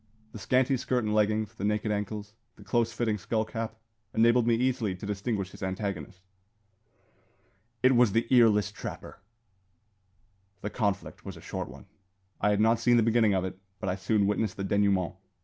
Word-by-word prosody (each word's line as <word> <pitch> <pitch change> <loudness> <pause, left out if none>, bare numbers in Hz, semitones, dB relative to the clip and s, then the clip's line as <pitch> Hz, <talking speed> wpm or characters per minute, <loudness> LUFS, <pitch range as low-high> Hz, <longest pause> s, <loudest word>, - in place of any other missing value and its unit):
The 110 - -9
scanty 130 +5 +2
skirt 125 0 -1
and 105 0 -1
leggings, 110 0 +1
the 110 - -8
naked 105 +1 0
ankles, 105 0 -4 0.2
the - - -14
close 115 -1 +1
fitting 110 -1 -1
skull 110 +4 -1
cap, 115 0 -5 0.4
enabled 115 +1 +4
me 115 - +4
easily 120 -5 0
to 90 - -8
distinguish 100 -1 -2
his - - -13
antagonist. 95 -2 -4 1.6
It 130 0 +6
was 120 -3 +5
the 115 +3 +1
earless 110 -5 +5
trapper! - - -8 1.4
The 105 - -4
conflict 105 -5 -2
was - - -8
a - - -11
short - - -5
one. - - -12 0.5
I 105 - +2
had 105 0 +2
not 110 +1 +4
seen 120 +1 +4
the 115 - +4
beginning 110 -2 +3
of 95 -1 0
it, 95 0 -6 0.2
but 95 - -2
I 90 - 0
soon 100 +1 +1
witnessed 105 -1 0
the 100 - -3
denouement. 95 -2 +1
105 Hz, 175 wpm, -28 LUFS, 100-115 Hz, 1.6 s, It